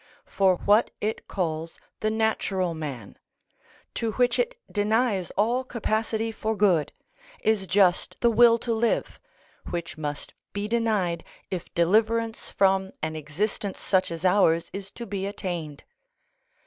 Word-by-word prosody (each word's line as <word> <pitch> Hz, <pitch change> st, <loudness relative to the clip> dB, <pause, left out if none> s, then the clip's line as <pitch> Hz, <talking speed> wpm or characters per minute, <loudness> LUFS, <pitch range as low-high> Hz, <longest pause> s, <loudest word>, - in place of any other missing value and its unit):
For 190 Hz, -2 st, +3 dB
what 210 Hz, +5 st, +3 dB
it 215 Hz, +1 st, -3 dB
calls 165 Hz, -3 st, -3 dB, 0.2 s
the 215 Hz, -, 0 dB
natural 215 Hz, -5 st, 0 dB
man, 140 Hz, -10 st, -7 dB, 0.7 s
to 225 Hz, -2 st, -2 dB
which 245 Hz, -, +2 dB
it -, -, 0 dB
denies 210 Hz, -2 st, +1 dB
all 235 Hz, +5 st, +2 dB
capacity 225 Hz, -2 st, -1 dB
for 220 Hz, 0 st, -2 dB
good, 185 Hz, -7 st, +3 dB, 0.5 s
is 215 Hz, -3 st, +1 dB
just 185 Hz, -2 st, +2 dB
the 235 Hz, -, +4 dB
will 230 Hz, +1 st, +6 dB
to 235 Hz, 0 st, -2 dB
live, 230 Hz, +1 st, 0 dB, 0.5 s
which 170 Hz, -2 st, -5 dB
must 145 Hz, -1 st, -4 dB, 0.2 s
be 205 Hz, +1 st, -2 dB
denied 210 Hz, -7 st, 0 dB, 0.3 s
if 180 Hz, -3 st, -4 dB
deliverance 225 Hz, +6 st, +2 dB
from 190 Hz, 0 st, +2 dB
an 155 Hz, 0 st, -2 dB
existence 185 Hz, +6 st, -3 dB
such 185 Hz, -1 st, +2 dB
as 165 Hz, +1 st, -5 dB
ours 180 Hz, -3 st, +3 dB
is 195 Hz, 0 st, -6 dB
to 235 Hz, -, -8 dB
be 195 Hz, -3 st, -3 dB
attained. 175 Hz, -7 st, -5 dB
200 Hz, 135 wpm, -26 LUFS, 175-220 Hz, 0.7 s, will